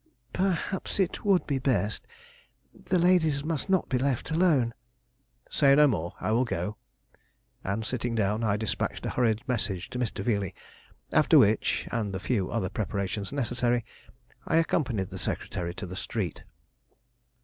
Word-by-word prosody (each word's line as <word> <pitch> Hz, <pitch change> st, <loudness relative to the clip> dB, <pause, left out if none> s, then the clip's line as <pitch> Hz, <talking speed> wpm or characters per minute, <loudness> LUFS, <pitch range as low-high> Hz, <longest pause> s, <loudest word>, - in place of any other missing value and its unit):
"Perhaps 190 Hz, +1 st, -1 dB
it 190 Hz, -3 st, 0 dB
would 195 Hz, -3 st, +3 dB
be 140 Hz, -2 st, 0 dB
best. 110 Hz, -6 st, 0 dB, 0.7 s
The 185 Hz, -, -1 dB
ladies 165 Hz, -5 st, +3 dB
must 160 Hz, +2 st, -2 dB
not 190 Hz, -3 st, +2 dB
be 130 Hz, -, 0 dB
left 135 Hz, +2 st, -1 dB
alone 155 Hz, -9 st, +3 dB, 0.4 s
" 125 Hz, -1 st, -37 dB
"Say 140 Hz, -2 st, +5 dB
no 150 Hz, +1 st, +7 dB
more; 85 Hz, -, -1 dB
I -, -, -1 dB
will 120 Hz, +3 st, +3 dB
go." 105 Hz, -3 st, -3 dB, 0.9 s
And, 100 Hz, +3 st, -2 dB
sitting 120 Hz, -1 st, -2 dB
down, 105 Hz, +1 st, +1 dB
I 105 Hz, -2 st, +2 dB
despatched 110 Hz, 0 st, -2 dB
a -, -, -1 dB
hurried 115 Hz, -2 st, +1 dB
message 100 Hz, -7 st, -2 dB
to 125 Hz, -, -4 dB
Mr. 115 Hz, -5 st, -2 dB
Veeley, 100 Hz, -5 st, -1 dB, 0.6 s
after 155 Hz, +1 st, +6 dB
which, 110 Hz, -5 st, +3 dB
and 105 Hz, -4 st, -2 dB
the -, -, -2 dB
few 100 Hz, -3 st, 0 dB
other 115 Hz, -5 st, -1 dB
preparations 100 Hz, 0 st, -3 dB
necessary, 120 Hz, -3 st, 0 dB, 0.6 s
I -, -, +1 dB
accompanied 130 Hz, -, +1 dB
the -, -, -6 dB
secretary 85 Hz, 0 st, -3 dB
to 100 Hz, -, -5 dB
the 90 Hz, +1 st, -7 dB
street. 95 Hz, -, -4 dB
120 Hz, 155 wpm, -28 LUFS, 105-145 Hz, 0.9 s, no